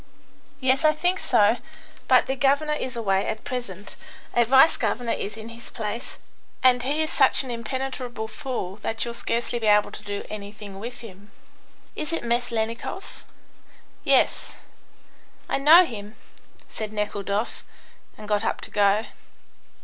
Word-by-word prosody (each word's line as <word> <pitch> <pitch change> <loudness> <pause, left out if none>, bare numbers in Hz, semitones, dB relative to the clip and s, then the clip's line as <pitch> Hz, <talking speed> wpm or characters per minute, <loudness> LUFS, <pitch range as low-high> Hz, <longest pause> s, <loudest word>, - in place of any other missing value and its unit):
"Yes, 265 +2 +2
I 310 0 +5
think 355 +4 0
so. 225 -1 +3 0.5
But - - +5
the 265 - -2
governor 280 +3 +2
is 260 -4 -4
away 195 -4 0
at 220 - -4
present; 210 -6 -6 0.4
a 240 - +4
vice 265 +6 +6
governor 240 -2 -1
is 210 +2 -3
in 220 +1 -8
his 230 0 -10
place. 220 +2 -5 0.5
And 250 -1 +5
he 290 +5 0
is 315 - -3
such 270 0 +6
an 260 - -6
impenetrable 245 -1 -4
fool 215 -4 -5
that 225 +2 -2
you'll 235 - -4
scarcely 235 +1 -2
be 220 - -1
able 210 0 +4
to - - -8
do 205 -1 -5
anything 205 -1 -8
with 240 +4 -7
him." 205 -2 -12 0.7
"Is 305 +1 -3
it 330 - -2
Meslennikoff?" 235 -1 -3 0.8
"Yes." - - +2 0.9
"I - - 0
know 325 +6 +8
him," 210 -5 -8 0.5
said 215 -1 -6
Nekhludoff, 210 +1 -2 0.5
and 210 - -10
got 210 0 +1
up - - -1
to - - -6
go. 205 +1 +3
230 Hz, 150 wpm, -25 LUFS, 210-260 Hz, 0.9 s, know